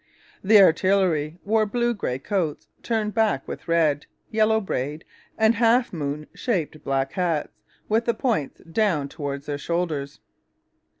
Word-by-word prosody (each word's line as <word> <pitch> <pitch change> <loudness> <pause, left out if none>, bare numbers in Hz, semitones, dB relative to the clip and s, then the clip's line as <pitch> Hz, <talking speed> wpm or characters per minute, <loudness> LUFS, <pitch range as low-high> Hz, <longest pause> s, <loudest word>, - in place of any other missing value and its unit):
The 210 +2 +7
artillery 180 -4 +3
wore 215 +1 +2
blue 240 +2 0
grey 130 - -3
coats 155 - -2
turned 220 -3 -1
back 220 - +1
with - - -7
red, 155 -4 +2 0.2
yellow 220 0 +3
braid, 150 -5 -4 0.3
and 220 0 +4
half 235 +1 +3
moon 150 -2 -3
shaped 165 - -2
black 135 0 0
hats, 170 -5 0 0.4
with 225 +2 +1
the 235 - +1
points 215 - -1
down 165 -5 0
towards 140 -1 -5
their 145 -1 -4
shoulders. 155 -4 -2
175 Hz, 135 wpm, -24 LUFS, 145-220 Hz, 0.4 s, The